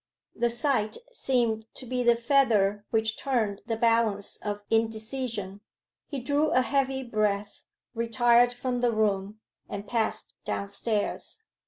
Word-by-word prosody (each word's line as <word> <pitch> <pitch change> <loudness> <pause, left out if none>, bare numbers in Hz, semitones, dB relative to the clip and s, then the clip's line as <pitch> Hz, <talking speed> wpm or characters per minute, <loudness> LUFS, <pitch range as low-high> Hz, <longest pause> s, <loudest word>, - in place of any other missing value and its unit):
The 240 - +1
sight 235 -3 0 0.2
seemed 235 - +1
to - - -8
be 250 +1 -1
the 240 -1 +5
feather 225 -5 +2
which 220 -1 0
turned 220 -7 0
the 225 - 0
balance 225 -3 +1
of 205 -1 -5
indecision: 220 -2 -1 0.5
he 280 - -4
drew 285 +5 +1
a 255 - +4
heavy 270 -1 0
breath, 210 -3 -1 0.3
retired 240 +1 +4
from 245 0 -3
the 245 -1 +3
room, 210 -1 0 0.3
and 200 +1 -6
passed 225 -1 -1
downstairs. 205 - -3
230 Hz, 130 wpm, -27 LUFS, 210-250 Hz, 0.5 s, the